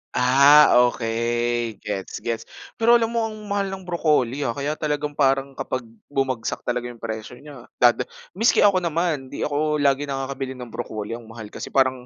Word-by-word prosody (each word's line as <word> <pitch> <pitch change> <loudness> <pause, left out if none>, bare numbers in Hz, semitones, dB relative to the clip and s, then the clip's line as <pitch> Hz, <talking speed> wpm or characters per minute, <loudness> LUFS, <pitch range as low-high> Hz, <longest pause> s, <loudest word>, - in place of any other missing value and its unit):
Ah, 140 +4 +7 0.2
okey 120 -1 -1
gets, 100 -3 -5
gets. 115 -1 -3 0.3
Pero 230 +1 +4
alam 225 - +1
mo 230 -1 0
ang 220 - -5 0.2
mahal 200 0 0
ng 190 - -6
broccoli, 150 -6 0
ah, 120 - -1
kaya 145 +3 -3
talagang 150 -1 -2
parang 135 -1 +1
kapag 130 - -3 0.2
bumagsak 130 -5 -2
talaga 120 0 -2
'yong 120 -1 -9
presyo 110 0 -5
n'ya 140 -5 -12 0.2
dada 120 -1 +4 0.3
maski 225 +3 +4
ako 200 -2 +5
naman, 165 -6 -1
'di - - -5
ako 150 0 0
lagi 140 +1 +2
nakakabili 135 -1 -4
ng 125 -2 -9
broccoli 110 +1 -5
ang 120 - -13
mahal 110 -1 -10
kasi, - - -8
parang 130 -2 +2
135 Hz, 175 wpm, -23 LUFS, 120-150 Hz, 0.3 s, Ah